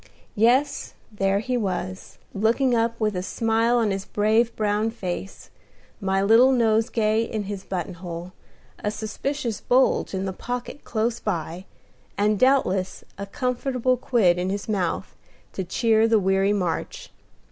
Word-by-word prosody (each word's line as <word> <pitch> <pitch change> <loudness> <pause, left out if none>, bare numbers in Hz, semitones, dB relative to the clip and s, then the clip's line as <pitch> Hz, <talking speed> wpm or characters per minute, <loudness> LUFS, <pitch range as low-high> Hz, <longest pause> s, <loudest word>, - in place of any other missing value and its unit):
Yes, 250 +7 +2 0.2
there 195 -1 +1
he 250 +5 -2
was, 185 -4 -3 0.2
looking 230 +5 +2
up, 230 0 +1
with 215 -3 0
a 180 - -1
smile 225 +4 +1
on 225 -3 +2
his 195 0 -2
brave 220 +4 +1
brown 210 +1 0
face, 195 -3 -6 0.5
my 195 -1 0
little 230 +6 +6
nosegay 225 -2 +2
in 215 -2 -3
his 200 -1 -6
button 185 0 -4
hole, 175 0 -7 0.5
a 210 - +1
suspicious 225 +3 -3
bulge 255 -5 +2
in 190 0 -2
the 190 - -3
pocket 245 +7 -6
close 225 +1 -1
by, 175 -2 -4 0.5
and 210 0 +2
doubtless 195 -9 +2 0.2
a 200 - -5
comfortable 255 +2 0
quid 215 -8 +2
in 180 +1 -1
his 200 +1 -3
mouth, 195 -6 -2 0.4
to 190 - -3
cheer 220 +4 +2
the 225 -1 +4
weary 195 0 +2
march. 180 -5 -3
215 Hz, 145 wpm, -24 LUFS, 195-235 Hz, 0.5 s, little